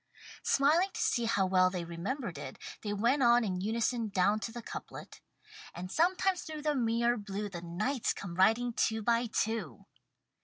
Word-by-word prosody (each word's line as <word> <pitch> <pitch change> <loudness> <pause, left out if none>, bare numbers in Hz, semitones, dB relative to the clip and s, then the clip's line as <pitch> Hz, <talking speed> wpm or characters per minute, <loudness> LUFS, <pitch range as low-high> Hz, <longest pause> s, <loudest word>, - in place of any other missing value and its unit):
Smiling 310 +7 +3
to - - -4
see 235 - +1
how 200 -4 +2
well 185 -1 +4
they 180 -2 -4
remembered 175 - -4
it, 135 -2 -7 0.2
they 210 - -3
went 235 +7 +2
on 240 -1 +5
in 185 -4 -2
unison 225 +2 0
down 200 +2 +2
to 225 - -5
the 235 0 -8
couplet: - - -9 0.5
"And 180 +1 -6
sometimes 365 +2 +2
through 310 -1 -7
the 300 -1 +1
mirror 235 -1 +1
blue 205 0 -4
The 175 -3 -7
knights 210 +10 -1
come 180 -4 -6
riding 225 +7 +3
two 220 -2 0
by 235 +2 +2
two." 215 - -2
225 Hz, 170 wpm, -31 LUFS, 190-245 Hz, 0.5 s, on